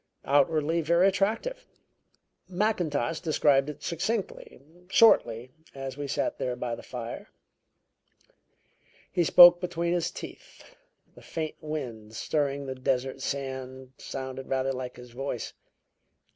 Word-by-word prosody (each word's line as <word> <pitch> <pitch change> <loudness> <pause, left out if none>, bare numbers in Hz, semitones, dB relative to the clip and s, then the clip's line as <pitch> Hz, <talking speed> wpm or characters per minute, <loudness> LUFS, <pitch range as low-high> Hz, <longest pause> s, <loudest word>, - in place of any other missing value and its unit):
Outwardly 155 +3 +2
very 170 +4 +4
attractive. 225 - -1 0.8
Mackintosh 175 - 0
described 150 -4 +3
it 150 - -9
succinctly, 195 - -3 0.3
shortly, 125 - +4 0.2
as 135 -1 -6
we 145 0 -5
sat - - -2
there 125 -1 -2
by 120 -1 -4
the - - -6
fire. 120 -2 -7 1.8
He 175 - +2
spoke 175 +1 +9
between 170 -1 -1
his 175 -2 0
teeth - - -11 0.4
the - - -16
faint 160 -2 -5
wind 120 -9 -6
stirring 140 +1 -1
the 130 - -4
desert 130 0 -2
sand 130 -1 -5
sounded 130 0 -6
rather 135 0 0
like 125 -1 -6
his 125 -1 -12
voice." 125 -1 -5
140 Hz, 115 wpm, -28 LUFS, 130-170 Hz, 1.8 s, spoke